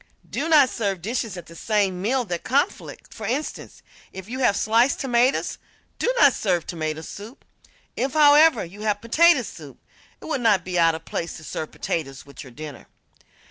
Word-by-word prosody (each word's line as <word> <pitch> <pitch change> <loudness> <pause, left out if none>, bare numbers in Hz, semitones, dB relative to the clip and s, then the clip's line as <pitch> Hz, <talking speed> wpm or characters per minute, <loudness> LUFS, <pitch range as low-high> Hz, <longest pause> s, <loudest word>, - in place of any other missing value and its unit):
Do 325 - -3
not 290 -5 +5
serve 200 -5 -2
dishes 225 -2 -3
at 175 - -8
the 165 - -14
same 195 -1 0
meal 245 +5 0
that 175 -4 -4
conflict. 285 +8 -2
For 215 - -6
instance, 275 +7 -4 0.3
if 190 0 -9
you 255 +3 -5
have 240 -6 +2
sliced 230 +5 +2
tomatoes, 250 0 +1 0.4
do - - +1
not 285 -3 +6
serve 180 -5 -1
tomato 155 -2 -4
soup. 210 - -11 0.5
If, 265 +3 -2
however, 300 - +6
you 195 +5 -12
have 210 -1 0
potato 335 +10 +4
soup, - - -11 0.4
it - - -13
would 295 -5 -2
not 220 -4 +3
be 180 -1 -1
out 165 -1 +4
of 160 - -10
place 170 - -4
to 160 - -12
serve 155 0 -5
potatoes 135 -5 -4
with 140 - -11
your 135 - -12
dinner. 150 +3 -10
215 Hz, 180 wpm, -23 LUFS, 175-260 Hz, 0.5 s, not